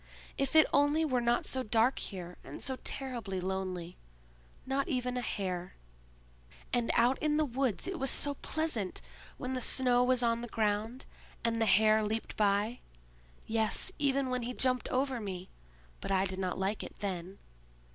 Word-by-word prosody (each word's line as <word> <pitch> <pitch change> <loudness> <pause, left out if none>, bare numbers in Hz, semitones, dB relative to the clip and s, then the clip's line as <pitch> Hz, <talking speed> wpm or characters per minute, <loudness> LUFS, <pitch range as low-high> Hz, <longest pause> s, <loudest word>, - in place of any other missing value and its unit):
If 275 +3 -1
it 315 - +8
only 290 +3 +4
were 255 -5 +1
not 235 0 +1
so 260 - -1
dark 230 +2 +2
here, 180 -3 -6
and - - -9
so 265 -1 +1
terribly 240 -8 -3
lonely! 185 -2 -4 0.7
Not 270 +1 -1
even 250 -1 -1
a 250 - -1
hare. 185 -5 -3 1.0
And 240 -2 +1
out 245 +3 +3
in 300 -1 +1
the 310 - +3
woods 260 - -1
it 375 -3 -3
was 270 - +1
so 285 - +3
pleasant, 280 - -2 0.4
when 255 +1 -4
the 255 - -2
snow 250 0 +3
was 250 0 +3
on 230 0 +1
the 240 - -5
ground, 220 +3 -1 0.4
and 230 0 +1
the 225 - +3
hare 215 +2 +5
leaped 220 +2 -3
by; 210 +3 +1 0.7
yes—even 270 - +2
when 250 -1 0
he 240 +1 -4
jumped 255 -1 +1
over 260 -1 0
me; 190 -3 -6 0.5
but - - -6
I 190 0 +3
did 190 0 -3
not 185 -1 -2
like 195 +3 -1
it - - -9
then. 190 -1 -4
235 Hz, 165 wpm, -32 LUFS, 200-260 Hz, 1.0 s, it